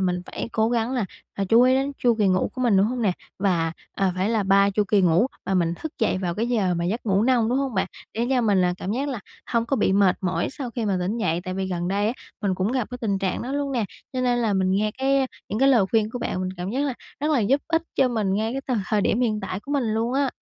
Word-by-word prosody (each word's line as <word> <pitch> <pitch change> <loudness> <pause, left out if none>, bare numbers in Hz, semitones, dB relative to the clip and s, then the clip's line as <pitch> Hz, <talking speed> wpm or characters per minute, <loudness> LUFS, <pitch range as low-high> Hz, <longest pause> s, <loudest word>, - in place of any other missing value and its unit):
mình 180 -1 0
phải - - -5
cố 220 0 +2
gắng 235 +1 0
là, 245 -6 0 0.3
à, 200 - -1
chú 230 +2 +6
ý 255 +1 +5
đến 275 +2 0
chu 240 -2 +3
kỳ 205 - +3
ngủ 185 0 +1
của 255 - -5
mình, 230 -5 +4
đúng 195 +2 +4
hông 245 +1 -2
nè? 195 -4 +3 0.3
Và, 170 -5 +1 0.2
ờ, 190 -2 +1
phải 190 +4 0
là 220 -3 +1
3 200 +1 +4
chu 210 +1 +1
kỳ 200 0 +3
ngủ 180 +5 +4 0.2
và 190 - -1
mình 170 -2 +1
thức 315 - -6
dậy 215 -5 +1
vào 175 -2 -2
cái 230 +4 -1
giờ 200 -7 +1
mà 170 0 -2
giấc 220 +6 -2
ngủ 195 +1 +3
nông, 240 -2 +3
đúng 255 +3 +1
hông 270 -5 -2
bạn? 190 - +1 0.3
Để 235 +2 0
cho 255 - +3
mình 205 -5 +3
là 180 0 +2
cảm 195 - -3
giác 275 +4 -1
là 245 -6 -4 0.3
hông 230 -1 0
có 275 - 0
bị 205 -4 +2
mệt 195 -2 +4
mỏi 185 -1 -1
sau 265 -3 -5
khi 235 -1 -3
mà 195 -3 +1
tỉnh 200 +6 -1
dậy, 170 -6 0
tại 185 0 -4
vì 190 0 -2
gần 175 -1 -2
đây 200 +2 +1
á 225 - +1 0.3
mình 195 -3 0
cũng 190 +6 -1
gặp 250 -5 -1
cái 250 - -6
tình 200 -4 0
trạng 190 -2 -2
đó 255 - -4
luôn 280 -1 -1
nè, 235 -4 0 0.3
cho 255 - -2
nên 245 -1 +2
là 225 -3 +1
mình 190 -1 +1
nghe 210 +2 +1
cái 270 0 +2 0.2
những 210 - -2
cái 270 - +5
lời 235 -7 +5
khuyên 220 -1 +2
của 245 - -5
bạn 185 - -2
mình 185 - -2
cảm 180 +2 -4
giác 265 +4 -1
là 265 - -2 0.3
rất 300 +1 0
là 270 - +3
giúp 265 +7 +2
ích 325 0 +2
cho 260 - +3
mình 210 -5 0
ngay 220 +2 0
cái 265 -1 -2
th 210 - 0
thời 215 - +2
điểm 215 +4 +1
hiện 215 -3 +1
tại 190 -1 -4
của 285 - -6
mình 275 -4 +1
luôn 225 +2 0
á. 275 -1 +1
220 Hz, 300 wpm, -24 LUFS, 190-250 Hz, 0.3 s, chú